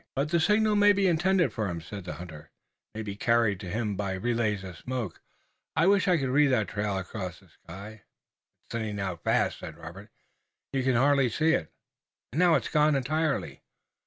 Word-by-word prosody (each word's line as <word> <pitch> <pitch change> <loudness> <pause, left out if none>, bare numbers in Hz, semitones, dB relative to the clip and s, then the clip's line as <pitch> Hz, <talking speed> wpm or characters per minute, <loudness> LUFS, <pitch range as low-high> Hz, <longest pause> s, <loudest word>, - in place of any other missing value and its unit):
"But 140 +2 0
the 170 +1 +2
signal 210 +4 +3
may 205 0 +6
be 200 0 +1
intended 175 - +2
for 110 -3 -2
him," 85 -2 -3
said 95 +4 -8
the 90 - -5
hunter. 80 -4 -10 0.5
"It - - -7
may 110 - -3
be 100 -2 -5
carried 115 -3 +2
to 95 -3 -7
him 105 +1 -2
by 100 -1 -2
relays 110 -1 -1
of 95 -2 -8
smoke. 125 -9 -5 0.5
I 160 - +3
wish 200 0 +4
I 180 -2 +4
could 135 -4 -1
read 145 +3 +4
that 120 -6 +1
trail 100 -1 -2
across 95 -1 -5
the - - -23
sky." 100 +5 -11 0.6
"It's - - -21
thinning 110 -3 -3
out 90 -4 -4
fast," - - +1
said 80 - -8
Robert. 85 +6 -10 0.6
"You 135 - +1
can 130 -1 +1
hardly 135 +1 +4
see 155 +8 +2
it! 80 - -1 0.6
and 150 - -1
now 175 -2 +5
it's - - 0
gone 150 -1 +3
entirely!" 155 +3 -1
115 Hz, 200 wpm, -28 LUFS, 100-155 Hz, 0.6 s, may